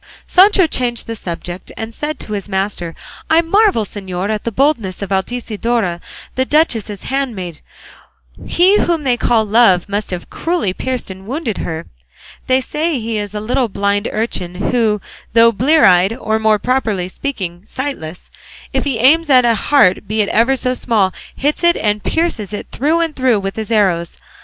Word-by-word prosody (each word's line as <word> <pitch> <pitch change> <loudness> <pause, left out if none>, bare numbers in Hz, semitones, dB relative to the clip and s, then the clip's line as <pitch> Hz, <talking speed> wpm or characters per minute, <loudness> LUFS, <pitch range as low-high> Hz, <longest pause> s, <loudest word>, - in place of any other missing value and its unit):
Sancho 380 0 +5
changed 245 -6 -1
the 230 - -5
subject, 175 -2 -7
and 225 +1 -5
said 300 +5 -4
to 215 - -6
his 205 0 -4
master, 190 -3 -2 0.3
"I 320 +1 +5
marvel, 395 - +3
señor, 190 0 -4
at 215 -1 -3
the 230 - -1
boldness 225 -7 0
of 200 - -6
Altisidora, 215 -2 -1 0.3
the 260 - +1
duchess's 235 - 0
handmaid; 220 - -3 0.9
he 375 +4 +4
whom 335 -3 0
they 255 -3 +2
call 225 -1 +2
Love 210 -4 +4
must 205 +1 -3
have 180 -1 -6
cruelly 330 - -1
pierced 255 -1 -4
and 190 +1 -11
wounded 260 -4 -3
her; 160 -1 -4 0.6
they 260 0 +3
say 305 +1 -2
he 225 -1 -2
is 205 0 -6
a - - -2
little 245 +4 0
blind 200 0 -1
urchin 190 -5 -2 0.2
who, 220 -4 +2 0.3
though 230 0 +6
blear 285 +8 +3
eyed, 185 +3 +5
or 220 -2 -1
more 220 -1 +3
properly 215 -5 -1
speaking 185 -6 -5
sightless, 225 - -6 0.4
if - - 0
he 270 -5 -1
aims 300 +7 +4
at 255 -3 +6
a 235 - +4
heart, 215 -6 +3
be 215 +1 +1
it 200 - -3
ever 235 +4 +3
so 255 -1 0
small, 215 -7 +1 0.2
hits 295 +5 -1
it 345 0 +4
and 210 -1 -1
pierces 285 - -1
it 205 - -5
through 315 +6 +1
and 325 -2 -2
through 255 -5 +2
with 195 0 -4
his 220 -1 -5
arrows. 185 -7 +1
225 Hz, 175 wpm, -17 LUFS, 195-265 Hz, 0.9 s, though